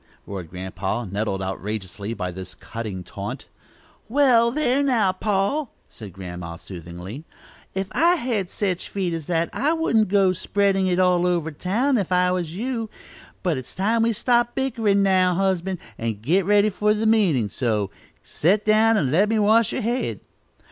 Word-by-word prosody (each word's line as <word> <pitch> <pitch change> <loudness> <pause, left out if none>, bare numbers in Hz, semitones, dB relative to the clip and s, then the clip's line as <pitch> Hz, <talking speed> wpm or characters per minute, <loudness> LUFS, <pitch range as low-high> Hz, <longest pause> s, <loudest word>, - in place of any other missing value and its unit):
roared 95 -5 -7
Grandpa 95 +5 -4
nettled 100 0 -2
outrageously 100 +1 -4
by 90 -3 -3
this 90 0 -9
cutting 105 -3 -6
taunt. - - -6 0.6
"Wall, 240 -3 +4
thar', 275 -1 +1
now, 235 -9 +2
pa," 200 +9 0 0.2
said 105 -4 -10
Grandma, 90 -2 -7
soothingly; 90 - -9 0.5
"if 190 0 -1
I 340 +3 +4
had 230 - -2
sech 185 -4 -1
feet 185 -3 -3
as 165 -3 -5
that, 170 -1 0
I 295 +5 +1
wouldn't 240 -10 +2
go 190 -1 +3
to - - -6
spreadin' 195 -1 +1
it 180 -1 +1
all 180 -1 +3
over 170 -3 0
town, 230 - 0
if 190 -2 -3
I 180 0 +3
was 175 -3 -2
you 230 +1 -3 0.5
but 165 -7 0
it's 130 - -11
time 220 +4 +1
we 230 +1 +3
stopped 240 +2 +1
bickerin' 225 -7 +1
now, 185 -2 +3
husband, 190 0 0 0.2
and 115 -3 -3
got 170 - +1
ready 205 +1 +4
for 210 +2 +1
meetin'; 210 - +2
so 105 -3 -1 0.3
set 195 +7 +1
down 220 +1 +4
and 135 -10 +1
let 195 +7 +3
me 225 - +1
wash 220 +2 +4
yer - - -2
head." 240 +3 -1
185 Hz, 165 wpm, -23 LUFS, -, 0.6 s, Wall